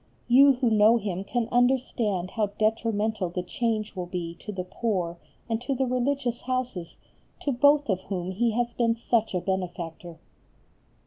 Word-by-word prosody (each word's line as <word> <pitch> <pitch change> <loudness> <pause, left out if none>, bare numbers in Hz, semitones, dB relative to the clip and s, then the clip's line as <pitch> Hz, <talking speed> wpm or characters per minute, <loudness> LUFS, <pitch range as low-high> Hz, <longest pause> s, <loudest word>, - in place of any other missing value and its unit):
You 275 +3 +7
who 245 -2 0
know 215 +2 +6
him 195 -4 -3
can 235 +3 -1
understand 240 -7 +1
how 220 -3 0
detrimental 220 -2 0
the 180 +1 -3
change 215 +2 -2
will 180 -1 -4
be 175 -2 -4
to - - -7
the 185 -3 -4
poor 180 -3 -2 0.3
and 225 -1 -1
to 265 +2 -2
the 265 +1 +1
religious 255 -1 -1
Houses, 250 -9 -3 0.4
to 285 - 0
both 285 +3 +4
of 190 -4 0
whom 185 -2 -3
he 230 +5 +1
has 235 +1 -1
been 230 -1 +1
such 225 -3 0
a - - +2
benefactor. 175 -3 -4
220 Hz, 165 wpm, -26 LUFS, 185-245 Hz, 0.4 s, You